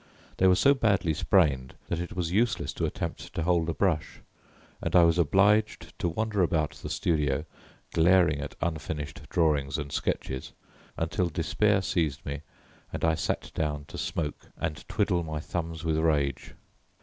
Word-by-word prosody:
They 95 - +4
were 90 - +6
so 140 +8 +5
badly 100 - +2
sprained 75 -7 +2
that 85 - -2
it 90 - -5
was 85 -2 -1
useless 115 +5 +1
to - - -1
attempt - - -5
to 85 - -1
hold 85 -1 +2
a - - 0
brush, 90 -6 0 0.6
and - - -2
I 90 - +8
was 85 +1 +4
obliged 100 +7 +3
to 85 - 0
wander 105 +3 -1
about 80 -3 +1
the - - -8
studio, 75 -3 0 0.5
glaring 85 -3 +4
at 75 - -6
unfinished 75 -3 -3
drawings 75 -5 +1
and 70 -2 -5
sketches, 65 -1 -3 0.4
until 85 +2 0
despair 95 +5 +1
seized 80 -8 -1
me 70 +1 -4 0.5
and - - -2
I 80 - +3
sat 80 - -2
down 75 -2 -2
to - - -8
smoke 75 -3 -3
and 80 -2 -3
twiddle 100 -4 +1
my 80 -2 -4
thumbs 85 0 -4
with 80 -1 +1
rage. 75 -5 0
80 Hz, 160 wpm, -28 LUFS, 75-90 Hz, 0.6 s, I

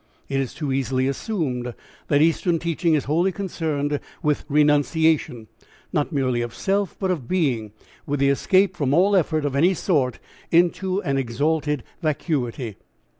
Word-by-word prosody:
It 135 - -1
is 135 -2 -3
too 150 -4 -3
easily 130 0 0
assumed 135 - -2 0.3
that 145 +1 +4
Eastern 165 +1 +2
teaching 165 0 +1
is 145 - 0
wholly 170 +6 +1
concerned 155 -7 -2 0.2
with 150 -2 0
renunciation, 150 -4 +2 0.5
not 150 +2 0
merely 130 -5 0
of 120 0 -5
self 200 0 -1
but 190 -2 0
of 150 -10 -3
being, 130 - 0 0.4
with 145 -1 -1
the 140 0 +3
escape 185 +7 +3
from 140 -3 +1
all 195 +4 +4
effort 155 -4 +1
of 140 -2 -1
any 175 +7 +4
sort 140 -10 0 0.3
into 185 +3 +2
an 140 -4 0
exalted 145 +3 -1 0.2
vacuity. 130 - -2
150 Hz, 150 wpm, -23 LUFS, 135-170 Hz, 0.5 s, that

